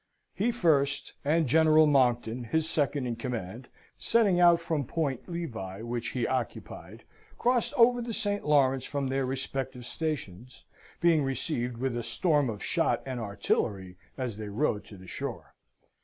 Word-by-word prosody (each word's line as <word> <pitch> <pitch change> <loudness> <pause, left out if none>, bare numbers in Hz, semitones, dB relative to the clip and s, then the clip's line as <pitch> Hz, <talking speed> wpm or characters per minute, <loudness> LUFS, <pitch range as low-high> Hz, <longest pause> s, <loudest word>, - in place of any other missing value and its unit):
He 225 +5 +1
first, 150 - +1
and 160 +3 +2
General 155 +3 +5
Monckton, 120 -4 +2
his 160 +7 0
second 145 -4 0
in 120 -1 -2
command 120 -1 -5 0.3
(setting 205 -6 +3
out 175 -1 +6
from 165 -3 -1
Point 140 +1 -3
Levi, 115 - -5
which 120 0 -3
he 125 -2 -1
occupied), 130 -3 -4 0.3
crossed 245 -1 +1
over 245 -1 +5
the 235 0 -4
St. 205 -2 -1
Lawrence 135 -3 +3
from 140 -2 -2
their 135 0 0
respective 130 -1 -4
stations, 125 - -5 0.4
being 165 -3 +4
received 125 -3 -2
with 130 0 -2
a 120 - -1
storm 150 0 +1
of 105 -3 -5
shot - - +1
and 130 -2 -4
artillery 100 -3 -2 0.2
as 125 -6 -3
they 105 -1 -6
rowed 105 -1 -1
to 100 - -12
the 95 - -13
shore. - - -6
135 Hz, 155 wpm, -29 LUFS, 120-160 Hz, 0.4 s, out